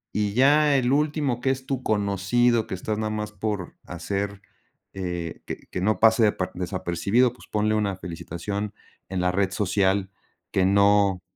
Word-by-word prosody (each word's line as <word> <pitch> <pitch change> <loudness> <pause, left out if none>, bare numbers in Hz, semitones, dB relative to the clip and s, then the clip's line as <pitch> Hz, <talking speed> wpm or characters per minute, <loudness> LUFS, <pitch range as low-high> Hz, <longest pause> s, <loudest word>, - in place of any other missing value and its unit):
Y 105 -1 0
ya 145 +3 +5
el 130 -1 +2
último 145 -4 +1
que 130 +1 +1
es 130 0 -4
tu 130 -2 -2
conocido, 110 +3 +2
que - - -7
estás 105 +3 -3
nada 110 0 -2
más 105 0 -3
por 105 -3 -4
hacer, 100 +4 -4 0.5
eh, 90 -3 -5
que - - -7
que 90 - -4
no 110 +3 +1
pase 110 0 +5
desa 95 -3 +1
desapercibido, 95 +6 +1
pues, 125 - -16
ponle 110 0 +1
una 100 -3 0
felicitación 95 +4 -5 0.3
en 95 -1 -2
la 90 0 +2
red 95 0 0
social, 95 0 +1 0.4
que 95 -1 +2
no 100 -1 +4
100 Hz, 165 wpm, -25 LUFS, 95-115 Hz, 0.5 s, ya